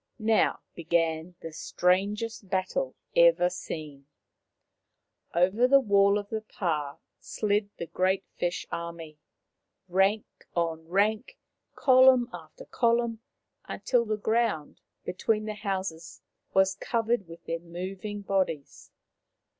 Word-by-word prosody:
Now 220 -1 +2
began 165 0 -1
the 165 -1 -7
strangest 200 +6 0
battle 185 -8 -1 0.2
ever 170 +1 +5
seen. 150 -5 -7 1.3
Over 190 +8 +4
the 275 +1 +7
wall 200 -4 +4
of 205 -1 -5
the 220 -1 -3
pah 155 -9 -3 0.2
slid 205 -1 -1
the 170 - -4
great 185 +3 0
fish 175 0 -2
army, 165 -2 -6 0.7
rank 195 +4 +2 0.3
on 165 -1 -1
rank, 215 - 0 0.4
column 255 -2 +6
after - - -10
column, 235 -1 +1 0.5
until 245 -2 0
the 215 -2 -2
ground 220 -8 -1 0.2
between 210 +4 0
the 215 - -3
houses 190 -6 -4 0.3
was 190 0 +3
covered 225 0 -1
with 165 0 -12
their 165 0 -3
moving 185 +4 -6
bodies. 185 -7 -2
190 Hz, 110 wpm, -28 LUFS, 170-215 Hz, 1.3 s, the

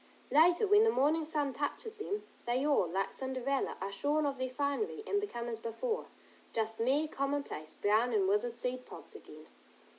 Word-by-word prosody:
Later, 345 +7 +5
when 415 +1 +6
the 450 - +5
morning 315 -3 +2
sun 300 -3 0
touches 430 - -3
them, 415 0 -3 0.2
they 250 +3 +1
all, 285 -11 +3
like 195 +3 -1
Cinderella, 265 +1 -2
are 195 +1 -3
shorn 295 +9 +1
of 275 -2 -2
their 260 0 -1
finery, 285 +11 -2
and 405 -2 +1
become 240 -13 -4
as 230 -2 -4
before, 445 - -3 0.5
just 225 0 -1
mere 275 +7 +2
commonplace, 275 - -3
brown 220 +4 +2
and 205 -4 +2
withered 220 +4 +1
seed 250 +1 -2
pods - - -11
again. - - -12
275 Hz, 175 wpm, -33 LUFS, 235-315 Hz, 0.5 s, when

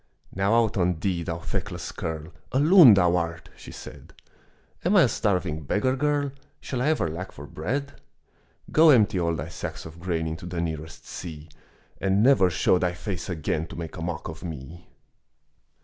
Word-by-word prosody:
"Now 100 +4 +2
out 115 -2 +2
on 90 -3 +1
thee, 90 -2 -1
thou 85 0 -3
feckless 90 -1 -4
kerl, 80 +1 -5 0.2
A 130 - +1
loon 155 - +8
thou 90 -2 +3
art," 85 -1 -4
she - - -11
said. - - -11 0.7
"Am - - +2
I - - +7
a - - +4
starving 90 -6 -1
beggar 105 - 0
girl? 145 0 0 0.3
Shall 125 -3 -4
I 135 - +1
ever 155 - +2
lack 85 +4 -6
for 70 - -10
bread?" 135 - -4 0.7
"Go 160 +1 +6
empty 105 -8 +5
all 85 -1 0
thy 70 - -5
sacks - - -6
of 80 +1 -11
grain 85 -2 -2
Into 80 +2 -5
the 90 -1 -4
nearest 80 -1 -5
sea, 80 -2 -8 0.5
And 100 +2 +2
never 125 -8 +5
show 90 +1 +2
thy 90 -1 0
face 90 +1 -5
again 80 -1 -2
To - - -10
make 85 -1 -6
a 85 - -7
mock 85 -1 -4
of 80 0 -8
me." 80 +1 -8
90 Hz, 180 wpm, -25 LUFS, 80-105 Hz, 0.7 s, loon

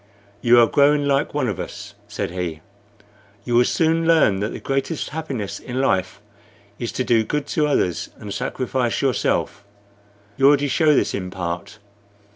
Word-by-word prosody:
"You 120 0 +6
are 120 - +7
growing 145 +3 +3
like 140 +1 0
one 140 -4 0
of 100 -6 -3
us," - - -7
said - - -4
he. 85 -3 -4 0.8
"You 120 - -2
will 120 +1 +5
soon 165 0 +1
learn 155 -13 +4
that 105 +2 -1
the - - -6
greatest 135 +3 -2
happiness 140 -10 -5
in 125 +1 -5
life 95 -9 0 0.6
is - - -3
to - - -1
do 115 -2 +3
good 145 +6 -2
to 150 -2 +1
others 90 - 0
and 105 -2 -7
sacrifice 125 -2 -2
yourself. 130 -5 0 0.7
You 135 - +5
already 145 0 +4
show 155 0 +3
this - - +1
in 95 -2 -4
part. 90 0 -5
130 Hz, 165 wpm, -21 LUFS, 100-145 Hz, 0.8 s, are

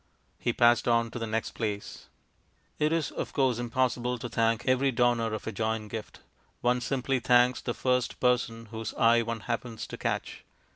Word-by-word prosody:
He 120 - 0
passed 120 0 +4
on 115 -1 +2
to 120 - -5
the 115 - -3
next 110 +1 -2
place.... 105 -3 -5 0.7
It 150 +1 +2
is, 165 -3 0
of - - -5
course, 130 -4 +2
impossible 125 0 0
to 120 +1 -6
thank 115 0 +1
every 130 +1 +3
donor 120 -2 +2
of 110 - -4
a - - -3
joint 110 0 -2
gift; 110 -2 -7 0.4
one 125 0 +2
simply 135 +1 0
thanks 125 0 +4
the 120 - -3
first 125 -1 0
person 115 -2 0
whose 110 -1 -5
eye 115 +1 +5
one 115 -1 -4
happens 115 0 -4
to - - -8
catch. - - -3
120 Hz, 180 wpm, -28 LUFS, 115-125 Hz, 0.7 s, eye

